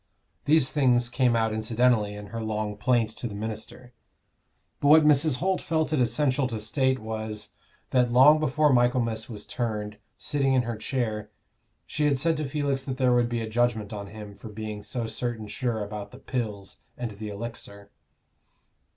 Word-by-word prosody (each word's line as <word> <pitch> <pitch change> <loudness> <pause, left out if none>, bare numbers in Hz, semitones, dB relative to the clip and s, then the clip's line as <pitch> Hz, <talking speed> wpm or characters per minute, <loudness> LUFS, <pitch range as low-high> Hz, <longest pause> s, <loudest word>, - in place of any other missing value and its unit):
These 150 -3 +3
things 125 -4 +3
came 125 -1 +2
out 110 -1 +1
incidentally 110 -1 +1
in 105 0 -9
her 115 - -3
long 110 -1 -2
plaint 115 0 +1
to 120 - -6
the 105 - -7
minister; 110 +4 -7 0.9
but 145 - +1
what 155 +2 +8
Mrs. 150 -1 +4
Holt 185 +6 0
felt 160 -1 0
it 145 - +2
essential 130 +3 +1
to 115 -3 -4
state 130 +4 +1
was, 110 -2 -5 0.4
that 125 -2 +3
long 140 +5 +7
before 150 0 +3
Michaelmas 120 -2 +1
was 105 -3 -6
turned, 105 -3 -3 0.2
sitting 135 -2 0
in 125 - +3
her 120 -1 -3
chair, 110 -2 -3 0.6
she 150 - -1
had 145 -2 +3
said 165 +4 +1
to 150 -2 -3
Felix 140 -2 -1
that 130 -2 -4
there 130 -2 +3
would 120 -1 +3
be 120 -1 -2
a 110 - -3
judgment 110 -2 0
on 100 -1 -6
him 105 0 -9
for 110 - -11
being 105 0 -6
so 120 +2 -4
certain 115 -1 -3
sure 110 +1 -2
about 105 0 -6
the 125 - -13
Pills 110 -7 -4 0.2
and 120 -2 -4
the 105 +1 -7
Elixir. 100 -2 -8
120 Hz, 175 wpm, -26 LUFS, 110-130 Hz, 0.9 s, what